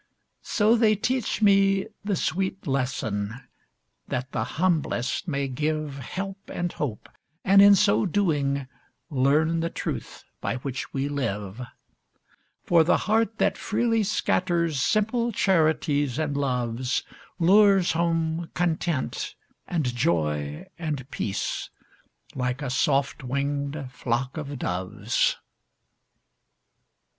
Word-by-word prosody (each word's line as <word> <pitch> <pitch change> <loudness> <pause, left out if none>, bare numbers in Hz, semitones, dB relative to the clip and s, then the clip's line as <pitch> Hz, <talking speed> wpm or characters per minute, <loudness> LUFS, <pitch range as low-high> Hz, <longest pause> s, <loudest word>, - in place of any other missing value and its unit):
So, 215 +2 +3
they 220 -2 +4
teach 230 +1 -1
me 195 -1 +4 0.2
the 200 -1 0
sweet 190 +3 -2
lesson, 120 -7 -1 0.7
That 130 +2 -3
the 110 - -1
humblest 160 -6 0
may 140 -3 -1
give 150 +1 -2
Help 195 +9 -5
and 175 0 -2
hope, 125 -8 -4 0.4
and 195 +1 +7
in 200 0 +9
so 110 - +3
doing, 145 -8 0 0.4
Learn 150 +5 +2
the 165 +1 -1
truth - - -5 0.2
by - - -1
which 130 +1 -5
we 135 0 -1
live; 105 -6 -3 1.0
For 170 -2 +5
the 165 - +3
heart 220 0 +1
that - - +1
freely 225 +1 +1
scatters 175 -7 +1
Simple 230 - +1
charities 155 - +2
and 150 -3 -1
loves, 125 -2 -1 0.3
Lures 195 +1 +5
home 165 0 0
content, 170 -4 -1 0.3
and 170 -3 0
joy, 75 -8 0
and 150 -6 -3
peace, 100 - -3 0.6
Like 125 +2 -2
a 130 - -2
soft 135 +1 +1
winged 140 +2 -2
flock 125 +1 -2
of 145 -2 -5
doves. 90 -4 0
155 Hz, 110 wpm, -26 LUFS, 130-190 Hz, 1.0 s, in